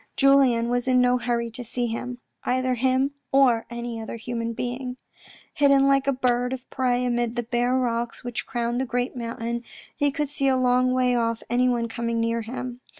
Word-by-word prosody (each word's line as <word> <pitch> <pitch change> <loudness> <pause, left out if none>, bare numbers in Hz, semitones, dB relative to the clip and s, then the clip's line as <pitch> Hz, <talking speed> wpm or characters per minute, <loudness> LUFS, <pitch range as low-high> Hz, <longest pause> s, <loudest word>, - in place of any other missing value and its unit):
Julien 270 -4 +4
was 245 +1 0
in 255 -1 +4
no 250 0 +3
hurry 235 -1 -1
to 245 +2 -7
see 240 +1 -2
him; 245 +2 -4 0.3
either 255 0 +1
him, 260 +3 +1 0.2
or 255 -4 +4
any 235 -1 -5
other 220 - -6
human 230 0 -3
being. 250 +2 -4 0.6
Hidden 275 -1 +4
like 275 0 +3
a - - +4
bird 250 -1 +1
of 260 0 -7
prey 250 -1 +1
amid 240 -1 0
the 240 - -1
bare 240 +2 0
rocks 235 -2 -2
which 245 -1 -4
crowned 240 0 -1
the - - -1
great 245 +1 -2
mountain, 235 0 -4 0.3
he 290 -1 +2
could 295 +1 -2
see 280 -1 -1
a 260 -1 +3
long 255 0 +3
way 255 -1 +2
off 230 -1 0
anyone 245 -1 +2
coming 230 0 -2
near 230 0 0
him. 245 +2 -6
245 Hz, 190 wpm, -25 LUFS, 235-255 Hz, 0.6 s, Julien